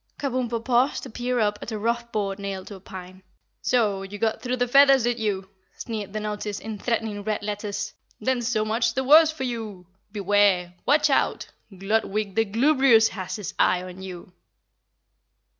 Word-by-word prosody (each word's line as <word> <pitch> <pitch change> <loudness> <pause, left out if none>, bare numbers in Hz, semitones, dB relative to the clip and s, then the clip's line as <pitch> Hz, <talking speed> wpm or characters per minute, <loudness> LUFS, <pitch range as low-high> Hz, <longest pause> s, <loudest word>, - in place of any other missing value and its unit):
Kabumpo 245 -4 -2
paused 250 +2 +2
to 260 - -8
peer 245 +1 -1
up 210 -1 +1
at - - -6
a 215 - -3
rough 235 +2 -2
board 200 -2 -2
nailed 195 -1 -5
to - - -8
a 195 - -10
pine. 185 0 -10 0.4
"So! 215 -6 +1
You 195 +1 -7
got 220 +1 -1
through 250 0 -1
the 245 0 +1
feathers, 275 0 +6
did 240 0 0
you?" 200 -3 -2 0.3
sneered 215 -4 -5
the 215 - -3
notice 210 -1 -4
in 215 -1 -7
threatening 220 -3 -2
red 215 0 -2
letters. 210 0 -4 0.3
"Then 250 +2 0
so 225 -2 0
much 225 +1 0
the 265 - 0
worse 305 +4 +7
for 315 -4 -6
you! 220 -7 -5 0.3
Beware! 200 -3 +2
Watch 295 +2 +4
out! - - +1 0.3
Gludwig 210 0 -1
the 225 +2 +2
Glubrious 235 0 +4
has 185 -2 -5
his 205 -6 -6
eye 180 0 +3
on 185 0 -9
you." 180 -1 -9
215 Hz, 175 wpm, -25 LUFS, 200-240 Hz, 0.4 s, worse